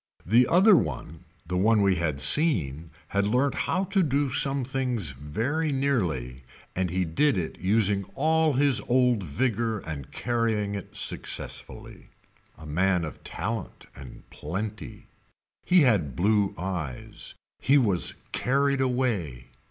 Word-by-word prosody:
The 120 +6 +4
other 195 +4 +6
one 80 - -3 0.2
the 90 +2 -2
one 105 +1 +3
we 95 -2 +2
had 80 -5 -2
seen 80 - +2 0.2
had 100 0 0
learnt 130 +6 +1
how 185 - -1
to 195 +1 +1
do 145 -3 +1
somethings 130 - 0
very 115 - -2
nearly 85 - -1 0.3
and 90 -1 -1
he 90 +1 -1
did 135 - +1
it 85 -3 -4
using 100 0 +1
all 160 +1 +2
his 140 0 +3
old 125 -3 +2
vigor 115 - -1
and 75 -8 -7
carrying 115 -4 -1
it 100 -2 -7
successfully. - - -4 0.5
A 80 - -12
man 90 +3 +1
of 75 - -9
talent 115 -3 -5
and 65 -1 -12
plenty. 105 +6 -6 0.6
He 180 -1 +5
had 95 - +2
blue 100 - +1
eyes. 85 -7 -5 0.2
He 140 +2 +4
was 100 -10 +2 0.2
carried 140 +1 +1
away. 105 - -2
105 Hz, 130 wpm, -26 LUFS, 85-130 Hz, 0.6 s, other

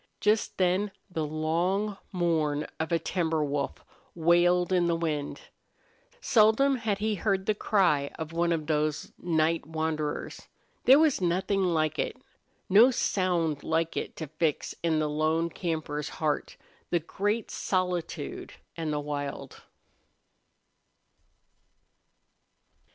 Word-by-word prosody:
Just 210 +2 +1
then 185 +3 +2 0.2
the 160 -3 -2
long 175 +7 0 0.2
mourn 160 -5 0
of 160 +2 -2
a 170 - +4
timber 160 -3 -1
wolf 140 -1 -3 0.3
wailed 175 +2 +3
in 180 -1 +3
with - - +1
the 170 - +2
wind. 155 -3 -3 0.8
Seldom 250 - +4
had 220 -4 -1
he 215 +2 0
heard 195 -1 0
the 215 - +2
cry 180 -9 +2
of 160 0 -6
one 170 +1 +1
of 160 -2 -1
those 150 -1 -1
night 165 -2 +1
wanderers. 155 -2 -3 0.4
There 265 +2 +8
was 305 -8 +3
nothing 185 +3 +1
like 155 -3 0
it - - -2 0.5
no 220 +6 +7
sound 175 - 0
like 165 0 0
it - - -4
to 160 - -5
fix 155 0 -1
in 165 -2 +1
the 155 0 +1
lone 155 +2 0
camper's 155 -4 -3
heart 150 -2 -2 0.3
the 175 - +2
great 205 +7 -2
solitude 180 -5 -2 0.2
and 160 -2 -3
the 150 - -1
wild. 145 -1 -5
165 Hz, 125 wpm, -28 LUFS, 155-190 Hz, 0.8 s, There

